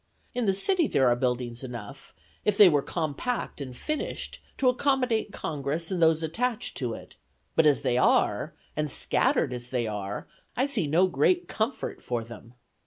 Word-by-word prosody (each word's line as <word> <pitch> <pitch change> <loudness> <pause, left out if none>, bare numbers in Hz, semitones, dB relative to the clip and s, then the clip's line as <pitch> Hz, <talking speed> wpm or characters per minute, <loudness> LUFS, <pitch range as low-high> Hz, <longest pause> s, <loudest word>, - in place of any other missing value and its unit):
In 245 -3 -1
the 195 - +3
city 345 - +2
there 130 - +3
are 120 - +4
buildings 125 -1 -2
enough, 125 +1 -8 0.3
if 205 -1 +1
they 205 - +10
were 150 -5 +4
compact 160 - -3
and 130 -3 -7
finished, 305 0 -4 0.2
to 265 - +2
accommodate 250 -4 +1
Congress 155 0 -3
and 180 -2 -1
those 160 0 +4
attached 225 +9 -2
to 120 -5 -2
it; - - -13 0.4
but 155 - +5
as 140 -2 +3
they 125 -3 +1
are, 105 +3 +2 0.2
and 150 0 -1
scattered 125 - +1
as 120 0 -6
they 125 -2 -1
are, 105 -2 -4 0.3
I 260 - +3
see 230 - 0
no 165 +6 +4
great 355 - +2
comfort 225 +5 -3
for 120 -2 -2
them. 120 +1 -12
150 Hz, 175 wpm, -27 LUFS, -, 0.4 s, they